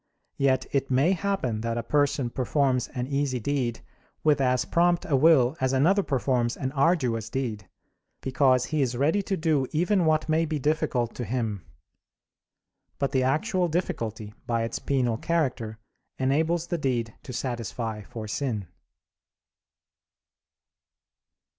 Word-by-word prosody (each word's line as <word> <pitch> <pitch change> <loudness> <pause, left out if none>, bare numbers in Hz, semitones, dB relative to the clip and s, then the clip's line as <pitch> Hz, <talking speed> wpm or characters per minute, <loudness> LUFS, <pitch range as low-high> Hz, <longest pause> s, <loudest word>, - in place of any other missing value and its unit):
Yet 135 -1 +2
it 135 -1 0
may 135 +7 +3
happen 185 - -1
that 115 0 -2
a 120 - -2
person 145 -1 +1
performs 130 -1 +1
an 125 -1 -4
easy 140 -2 -1
deed 125 -2 -1 0.4
with 150 -2 +3
as 125 -1 +2
prompt 175 0 +2
a 145 - +1
will 135 -2 +5
as 130 0 +1
another 170 +10 +4
performs 130 -6 0
an 130 -1 -2
arduous 135 - +1
deed; 115 -6 -4 0.5
because 130 -1 +3
he 155 -2 -1
is 125 -2 0
ready 155 +10 +2
to 195 0 -2
do 155 -5 +1
even 180 +3 +2
what 155 0 +2
may 160 +1 +2
be 155 -1 -2
difficult 145 -5 0
to 125 - -3
him. 110 -4 -2 1.3
But 140 - -1
the 130 - +2
actual 175 - +1
difficulty, 110 - -3
by 115 -1 0
its 115 - -3
penal 125 -5 0
character, 125 -9 -1 0.4
enables 160 +6 +1
the 175 0 -2
deed 120 -5 -1
to - - -9
satisfy 120 -3 -4
for 110 +1 -8
sin. 105 - -3
130 Hz, 140 wpm, -26 LUFS, 120-155 Hz, 1.3 s, will